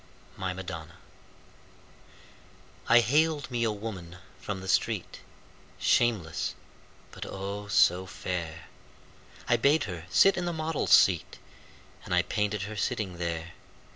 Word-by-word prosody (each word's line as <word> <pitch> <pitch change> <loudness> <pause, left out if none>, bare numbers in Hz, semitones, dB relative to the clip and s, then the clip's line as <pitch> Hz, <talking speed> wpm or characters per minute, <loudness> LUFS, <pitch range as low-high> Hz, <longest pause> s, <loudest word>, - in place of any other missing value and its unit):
My 95 -1 -3
Madonna 85 -3 -7 1.9
I 120 +1 +8
haled 150 +4 +1
me 120 -1 0
a 115 - +2
woman 100 -5 -7 0.2
from 95 0 -4
the 95 - -8
street, - - 0 0.6
Shameless, 110 -10 +1 0.6
but, - - -8
oh, 100 +1 -5
so 95 -2 +3
fair! 85 -2 -5 0.8
I 120 - +4
bade 145 +6 +3
her 85 -4 -6
sit 195 0 +5
in 175 - -1
the 175 - -1
model's 160 -1 -2
seat 90 -6 +4 0.7
And 90 - -1
I 90 - +4
painted 105 0 -1
her 105 +2 -6
sitting 105 -5 -2
there. 85 -1 -3
100 Hz, 125 wpm, -28 LUFS, 90-120 Hz, 1.9 s, I